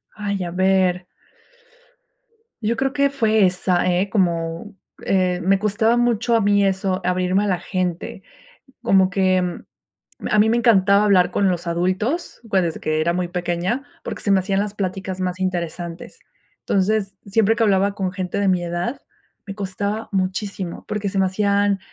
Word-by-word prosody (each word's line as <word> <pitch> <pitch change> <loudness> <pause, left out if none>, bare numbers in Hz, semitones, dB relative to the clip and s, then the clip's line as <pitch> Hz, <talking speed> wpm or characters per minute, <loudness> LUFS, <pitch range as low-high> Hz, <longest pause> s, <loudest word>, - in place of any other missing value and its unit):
Ay, 200 -3 -3
a 170 - -5
ver. 185 -1 +1 1.6
Yo 230 +2 0
creo 270 0 0
que 280 0 +2
fue 220 -6 +2
esa, 180 0 0
¿eh?, 185 +3 0
como, 170 +1 -1 0.3
eh, 185 -2 +1
me 195 +1 +3
costaba 215 +3 +1
mucho 240 -1 +2
a 225 - +3
mí 205 0 +3
eso, 190 -1 0
abrirme 185 +2 +1
a - - -1
la 185 -3 0
gente. 185 0 -3 0.6
Como 190 -4 +4
que, 185 -2 0 0.7
a 210 - +3
mí 220 +1 +4
me 235 - +2
encantaba 205 -3 +4
hablar 185 -3 +4
con 200 - +1
los 175 -2 -1
adultos, 185 - -1
pues, 190 -3 +2
desde 165 -2 -3
que 155 0 0
era 170 +2 +1
muy 180 -1 -2
pequeña, 180 +8 -2 0.2
porque - - -6
se 200 - -2
me 195 - +5
hacían 195 +1 -1
las 205 0 -2
pláticas 190 -1 -4
más 185 0 -2
interesantes. 175 - -4 0.4
Entonces, 195 0 0
siempre 220 +2 +2
que 230 - +1
hablaba 200 -1 +2
con 190 -2 -2
gente 185 +1 -3
de 195 - +2
mi 180 -1 +2
edad, 175 +10 -3 0.5
me 195 - -6
costaba 200 +2 -3
muchísimo, 190 -1 -3
porque 210 -1 -3
se 195 - -3
me 190 - +3
hacían 200 0 +1
195 Hz, 165 wpm, -21 LUFS, 180-205 Hz, 1.6 s, me